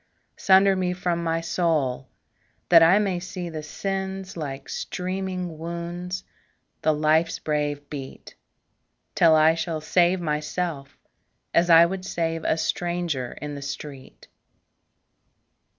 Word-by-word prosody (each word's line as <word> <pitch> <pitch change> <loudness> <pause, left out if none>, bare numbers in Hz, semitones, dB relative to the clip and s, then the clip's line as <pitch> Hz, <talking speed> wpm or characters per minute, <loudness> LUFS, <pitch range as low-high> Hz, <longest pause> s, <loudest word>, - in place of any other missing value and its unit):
Sunder 195 0 +5
me 180 -1 0
from 175 -2 -2
my 165 0 0
soul, 155 -7 -1 0.6
that 170 -2 +8
I 165 +4 +6
may 195 -4 0
see 180 -1 -6
The 155 -2 -5
sins 190 +3 -4
like 135 -4 -6
streaming 185 -2 -4
wounds, 170 +2 -5 0.6
the 155 - +3
life's 155 +2 +2
brave 145 -1 -2
beat; 135 -3 -8 0.8
Till 165 -2 +5
I 155 +1 +5
shall 165 -1 -3
save 175 +3 +2
myself, 150 -2 -3 0.6
as 170 +1 +3
I 165 0 +8
would 185 +2 -4
save 165 -3 -2
A 160 - +2
stranger 170 -7 -2
in 150 0 -4
the 140 - -7
street. 140 -1 -8
165 Hz, 120 wpm, -24 LUFS, 155-180 Hz, 0.8 s, that